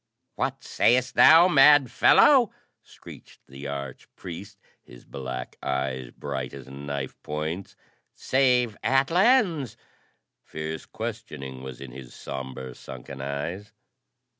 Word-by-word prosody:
"What - - -3
sayest 125 +1 +2
thou, 165 +3 +8
mad 145 -4 +6
fellow?" 260 -7 +5 0.3
screeched - - -15
the 70 +2 -9
arch 70 -2 -6
priest, 100 +4 -9 0.2
his - - -16
black 65 -2 -7
eyes 65 -2 -3
bright 65 0 -6
as 65 -2 -11
knife 70 0 -6
points. 80 +5 -5 0.4
"Save 125 -4 +2
Atlans 165 - +2 0.3
?" - - -50
Fierce 80 0 -6
questioning 65 -1 -7
was 65 -1 -8
in 65 -2 -9
his 65 -1 -11
sombre, 65 -1 -7
sunken 65 +2 -10
eyes. 80 +9 -5
70 Hz, 115 wpm, -25 LUFS, -, 0.4 s, thou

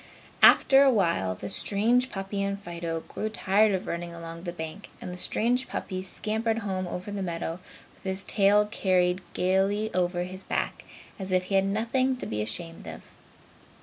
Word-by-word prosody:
After 270 0 +7
a 280 - +6
while, 170 - +1
the 100 - -7
strange 235 - +3
puppy 195 -1 -4
and 200 0 -2
Fido 170 -3 -4
grew 215 - -5
tired 210 0 +3
of 190 -2 -1
running 170 0 -4
along 165 0 -8
the 175 - -2
bank 160 +3 -7
and 180 - -7
the - - -6
strange 245 +7 +1
puppy 185 -1 -4
scampered 220 +4 -2
home 185 -2 -2
over 180 +3 -5
the 200 -1 -3
meadow, 170 -1 -3 0.3
with - - -26
his 190 0 -2
tail 205 0 +3
carried 185 -3 +1
gaily 195 +4 +1
over 175 0 0
his 185 +1 -3
back - - -3 0.3
as 190 -1 -5
if 185 0 +3
he 190 - -6
had 195 0 +4
nothing 245 +6 +1
to - - -5
be 105 0 -2
ashamed 165 - -4
of. 80 0 -8
190 Hz, 180 wpm, -27 LUFS, 175-210 Hz, 0.3 s, After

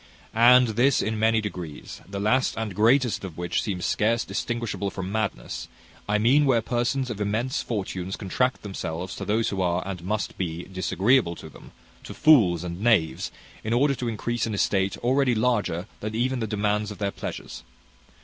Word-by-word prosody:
"And 125 +2 +6
this 125 +5 +3
in 110 0 -1
many 110 0 +3
degrees; 90 -7 -7
the 100 0 -4
last 125 +6 +2
and 110 -3 -3
greatest 115 +4 +3
of 90 -5 -7
which 90 0 -1
seems 95 -5 -3
scarce 115 +2 +1
distinguishable 115 -4 -3
from 95 -1 -5
madness; 105 - -3 0.4
I 105 - +3
mean 130 +7 +4
where 130 -4 +4
persons 125 +2 -1
of 105 -2 -5
immense 110 +6 -1
fortunes 95 -4 -4
contract 125 +7 -1
themselves 90 -3 -5
to - - -5
those 110 +2 +1
who 95 -2 -2
are, 90 0 0
and 90 -3 -5
must 105 +2 -3
be, 85 -2 -3
disagreeable 95 +2 +1
to - - -10
them - - -15 0.3
to - - -9
fools 100 - +5
and 90 +1 -5
knaves 105 -9 +2 0.3
in 110 - -1
order 140 +4 +3
to 125 -2 -4
increase 115 +1 -2
an 110 - -2
estate 95 -1 +1
already 130 0 +2
larger 105 -7 0 0.2
even 120 +5 -1
than 110 -2 -3
the 105 - -2
demands 105 0 0
of 105 - -8
their 100 +1 -1
pleasures. - - -7
105 Hz, 180 wpm, -25 LUFS, 95-120 Hz, 0.4 s, And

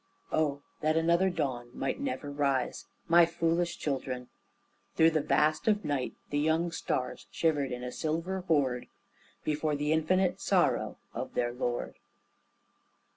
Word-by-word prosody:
Oh, 145 -2 0 0.2
that 155 +1 +2
another 170 +3 +3
dawn 130 -8 -2
might 135 - -2
never 255 - -3
rise! 140 -3 0 0.2
My 170 0 +7
foolish 170 +1 0
children!" 130 -3 -3 0.7
Through 165 0 +6
the 155 -1 +1
vast 150 +3 +2
of 210 -1 +2
night 145 -4 -1 0.2
The 145 - +1
young 160 +3 +2
stars 130 -5 -3
shivered 145 -5 +1
in 125 0 -4
a 125 - -4
silver 165 +6 -2
horde 135 -6 +1 0.6
Before 150 0 0
the 150 +2 +1
Infinite 180 +4 +2
Sorrow - - +2 0.2
of - - -5
their 120 0 0
Lord. 120 -1 -3
155 Hz, 135 wpm, -30 LUFS, 135-165 Hz, 0.7 s, My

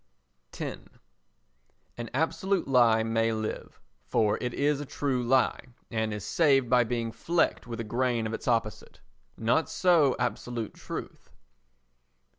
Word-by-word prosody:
x - - -4 1.2
An 120 -1 -6
absolute 165 +6 0
lie 120 -4 +4
may 115 0 +1
live—for 110 - -2
it 125 - -2
is 145 +2 0
a - - -5
true 135 -3 -1
lie, 125 +2 +2 0.3
and 110 -1 -1
is 105 -1 -5
saved 135 0 +3
by 125 -1 +6
being 115 -1 -2
flecked 170 +3 0
with 115 -1 -6
a - - -2
grain 120 +1 0
of 110 - -3
its - - -6
opposite. 115 -3 -1 0.4
Not 120 +8 +1
so 165 -8 +3
absolute 120 -2 -3
truth. - - -8
120 Hz, 130 wpm, -28 LUFS, 115-135 Hz, 1.2 s, by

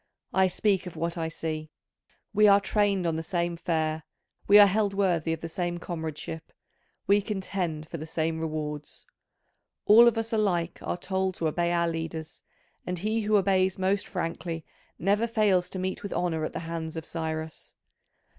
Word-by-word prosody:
I 190 0 +4
speak 190 0 0
of 175 - -8
what 170 +1 -2
I 165 -2 -2
see: 155 -1 -4 0.6
we 210 +1 +6
are 200 0 +7
trained 200 -3 +1
on 165 -1 0
the - - -2
same 170 +1 -1
fare; 160 -2 -1 0.5
we 205 - +8
are 205 - +10
held 200 0 +1
worthy 175 -5 +1
of 165 - -3
the 165 - -4
same 175 +1 -2
comradeship; 160 -2 -6 0.5
we 205 +1 +4
contend 185 -6 -3
for 165 - -6
the 155 - -6
same 160 0 -1
rewards. 150 -2 -5 0.8
All 230 +3 +8
of 235 - +3
us 225 +1 -2
alike 180 -6 0
are - - -3
told 190 0 -1
to 165 - -1
obey 170 +2 0
our 170 0 +2
leaders, 165 -1 -5 0.4
and 180 0 -3
he 215 +5 0
who 210 0 +3
obeys 190 -2 +2
most 190 +1 0
frankly 165 -2 -4 0.3
never 205 +6 +2
fails 205 -6 +2
to - - -5
meet 185 0 -3
with 200 - -5
honour 165 -3 0
at - - -5
the - - -4
hands 165 -1 -5
of 160 -1 -5
Cyrus. 160 -1 -5
175 Hz, 175 wpm, -27 LUFS, 160-195 Hz, 0.8 s, are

